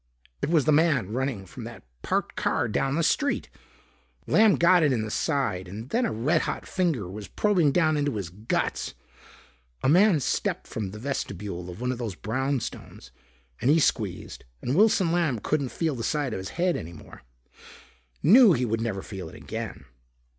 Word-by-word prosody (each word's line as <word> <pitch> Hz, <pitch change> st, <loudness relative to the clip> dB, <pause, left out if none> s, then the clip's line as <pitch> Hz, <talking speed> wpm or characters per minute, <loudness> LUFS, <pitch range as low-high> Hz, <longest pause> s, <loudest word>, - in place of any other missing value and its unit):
It -, -, -1 dB
was 160 Hz, -4 st, +3 dB
the 155 Hz, -, +4 dB
man 145 Hz, -, +2 dB
running 130 Hz, -6 st, -2 dB
from 85 Hz, -, -10 dB
that -, -, -10 dB, 0.2 s
parked -, -, -1 dB
car -, -, 0 dB
down 135 Hz, +5 st, 0 dB
the 165 Hz, -, +1 dB
street. 285 Hz, -, 0 dB, 0.7 s
Lamb 215 Hz, -3 st, +5 dB
got 175 Hz, +1 st, +5 dB
it 150 Hz, -3 st, +3 dB
in 115 Hz, -4 st, 0 dB
the 110 Hz, -, -5 dB
side 110 Hz, -, -1 dB
and 110 Hz, +7 st, -8 dB
then 240 Hz, +1 st, +2 dB
a -, -, -3 dB
red 145 Hz, +9 st, +1 dB
hot -, -, -4 dB
finger 165 Hz, -, -1 dB
was 100 Hz, +3 st, -8 dB
probing 180 Hz, -9 st, +2 dB
down 155 Hz, 0 st, +2 dB
into 145 Hz, -3 st, 0 dB
his 95 Hz, -5 st, -4 dB
guts. 105 Hz, +5 st, -2 dB, 0.9 s
A -, -, +2 dB
man 180 Hz, +1 st, +5 dB
stepped 130 Hz, -, -1 dB
from 105 Hz, -4 st, -4 dB
the 105 Hz, -, -9 dB
vestibule 100 Hz, -8 st, -4 dB
of 90 Hz, -, -9 dB
one 125 Hz, 0 st, 0 dB
of 125 Hz, -, -5 dB
those 110 Hz, -6 st, -4 dB
brownstones 130 Hz, -, -4 dB, 0.5 s
and 125 Hz, -, +2 dB
he 160 Hz, +3 st, +5 dB
squeezed 105 Hz, -, -1 dB, 0.2 s
and 125 Hz, -, -2 dB
Wilson 195 Hz, -3 st, +4 dB
Lamb 165 Hz, -8 st, +1 dB
couldn't 140 Hz, +4 st, -1 dB
feel 160 Hz, +2 st, -1 dB
the 120 Hz, -3 st, -5 dB
side 145 Hz, -1 st, -1 dB
of -, -, -3 dB
his 95 Hz, -, -6 dB
head 180 Hz, 0 st, +2 dB
any 85 Hz, +1 st, -6 dB
more. 80 Hz, -, -13 dB, 1.0 s
Knew 220 Hz, -, +8 dB
he 125 Hz, -4 st, 0 dB
would 115 Hz, 0 st, -1 dB
never 105 Hz, -4 st, -3 dB
feel 95 Hz, -5 st, -7 dB
it -, -, -13 dB
again. 70 Hz, -, -6 dB
130 Hz, 185 wpm, -26 LUFS, 105-165 Hz, 1.0 s, Knew